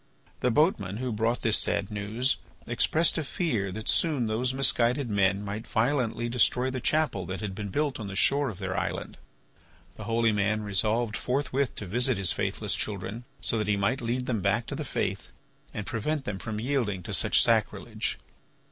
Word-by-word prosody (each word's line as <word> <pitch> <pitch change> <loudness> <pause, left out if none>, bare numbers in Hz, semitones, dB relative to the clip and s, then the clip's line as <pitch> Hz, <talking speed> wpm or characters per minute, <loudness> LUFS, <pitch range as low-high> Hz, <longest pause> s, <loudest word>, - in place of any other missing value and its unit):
The 125 - +2
boatman 110 - +2
who 125 +1 -2
brought 115 +3 0
this 115 -2 +5
sad 100 0 0
news 105 +6 0 0.3
expressed 160 +1 +2
a - - -1
fear 120 - -1
that 110 +3 -7
soon 150 -7 +2
those 115 +4 0
misguided 125 -1 +2
men 100 0 +2
might 105 +2 -5
violently 120 -1 0
destroy 125 +2 +2
the 130 -1 -4
chapel 150 - +1
that 95 +1 -4
had 105 -3 -4
been 100 +1 -5
built 145 +4 -1
on 105 - -5
the 95 - -6
shore 140 +6 +3
of 100 - -7
their 95 -1 -3
island. - - -3 0.8
The 110 - -7
holy 115 +1 +2
man 105 +1 0
resolved 105 +3 +1
forthwith 135 0 -1
to 100 - -5
visit 120 +5 +2
his 95 -3 +2
faithless - - -2
children, 105 +3 -4 0.2
so 115 - +1
that 105 - -1
he 105 -1 +2
might 110 +7 0
lead 120 +2 -1
them 115 -5 -1
back 105 +5 +1
to - - -5
the - - -3
faith - - -2 0.4
and 105 - -5
prevent 135 +5 -2
them 100 -2 -4
from 110 0 -4
yielding 115 -7 -1
to - - -4
such - - +4
sacrilege. - - 0
115 Hz, 185 wpm, -28 LUFS, 100-130 Hz, 0.8 s, this